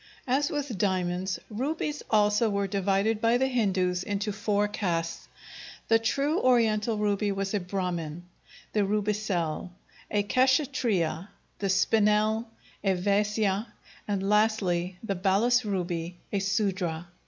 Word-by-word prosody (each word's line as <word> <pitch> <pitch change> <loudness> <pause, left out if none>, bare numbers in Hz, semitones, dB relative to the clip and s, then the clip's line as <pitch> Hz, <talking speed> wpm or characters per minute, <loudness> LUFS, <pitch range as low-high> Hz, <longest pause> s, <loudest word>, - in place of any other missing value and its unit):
As 275 +3 +1
with 280 -9 -3
diamonds, 185 -1 0
rubies 295 +6 -3
also 210 +1 +3
were 200 -1 0
divided 200 +3 0
by 230 +1 +4
the 265 - +2
Hindus 190 -8 +1
into 205 +1 -2
four 210 0 0
castes. 170 -5 -2 0.6
The 225 0 +5
true 275 +8 0
Oriental 225 -3 +2
ruby 205 0 0
was 195 0 -2
a 205 - +1
Brahmin; 175 -3 -3 0.5
the 210 - +2
rubicelle, 200 -5 -1 0.4
a 205 -1 +1
Kshatriya; 230 - +1 0.3
the 195 - -1
spinel, 215 +3 +2 0.4
a 195 -2 +2
Vaisya, 205 +2 +1 0.4
and 195 -2 -1
lastly, 195 -4 +1
the 200 - -1
balas 205 +7 +2
ruby, 175 -4 -3 0.2
a 200 - +2
Sudra. 190 -4 -1
205 Hz, 120 wpm, -28 LUFS, 190-220 Hz, 0.6 s, The